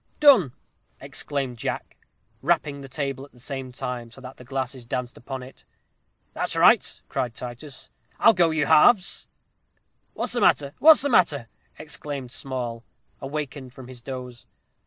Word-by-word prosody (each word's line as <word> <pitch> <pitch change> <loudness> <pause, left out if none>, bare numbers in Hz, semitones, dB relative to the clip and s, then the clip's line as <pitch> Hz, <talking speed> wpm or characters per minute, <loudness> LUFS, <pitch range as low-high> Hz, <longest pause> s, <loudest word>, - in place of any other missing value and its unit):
"Done!" 245 - +6 0.5
exclaimed 135 -4 -4
Jack, - - -4 0.5
rapping 140 -1 0
the 135 - -10
table 135 -1 -3
at 140 - -14
the 125 - -18
same 135 0 -5
time, 125 -1 -5
so 120 - -14
that 130 0 -10
the - - -12
glasses 130 0 -4
danced 125 +1 -4
upon 130 +1 -7
it. 130 - -14 0.7
"That's - - -2
right," - - +4
cried 120 -3 -2
Titus. 125 +3 -8 0.3
"I'll 225 - +6
go 175 -4 +4
you 155 -2 +1
halves." 195 +3 +4 0.9
"What's - - -2
the 240 - 0
matter 140 -7 +3
what's 315 -1 +8
the 285 - +1
matter?" 150 - +3 0.3
exclaimed 145 -4 -6
Small, 125 -4 -4 0.4
awakened 135 -2 -5
from 130 -2 -10
his 125 -2 -10
doze. 125 -2 -8
135 Hz, 150 wpm, -25 LUFS, 125-150 Hz, 0.9 s, what's